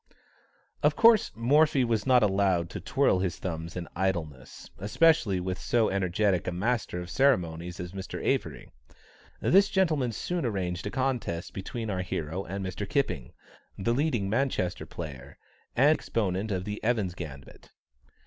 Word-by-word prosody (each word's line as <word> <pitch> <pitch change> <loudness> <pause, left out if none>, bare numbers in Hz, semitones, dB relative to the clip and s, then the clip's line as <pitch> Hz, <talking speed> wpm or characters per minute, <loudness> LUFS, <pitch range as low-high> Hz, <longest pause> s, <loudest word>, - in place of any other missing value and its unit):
Of - - +3
course 230 -1 +5
Morphy 140 +4 +3
was 115 -1 0
not 125 -3 +5
allowed 95 -4 +2
to - - -6
twirl 95 - +2
his 90 -3 -1
thumbs 85 -2 -5
in 90 -2 -5
idleness, 85 -8 -3
especially 105 - +3
with 90 +1 -3
so 115 -2 +2
energetic 95 0 +1
a - - 0
master 100 -1 -1
of - - -6
the 85 - -9
ceremonies 90 -10 +1
as 90 -1 -5
Mr. 95 -1 -6
Avery. - - -1 0.7
This 195 +2 +5
gentleman 160 - +1
soon 175 +9 -3
arranged 95 -5 -2
a - - -2
contest 125 -9 -2
between 110 +3 -4
our 95 -1 -1
hero 90 0 -3
and 95 +2 -4
Mr. 95 +2 -5
Kipping, 75 - -1 0.4
the 115 +5 0
leading 125 -7 0
Manchester 110 -6 -1
player, 70 -4 -8 0.4
and 135 +4 +5
exponent 100 -1 -1
of 95 -2 -2
the 105 0 -5
Evans' 110 -6 +1
Gambit. 75 -6 -10
95 Hz, 150 wpm, -28 LUFS, 90-120 Hz, 0.7 s, course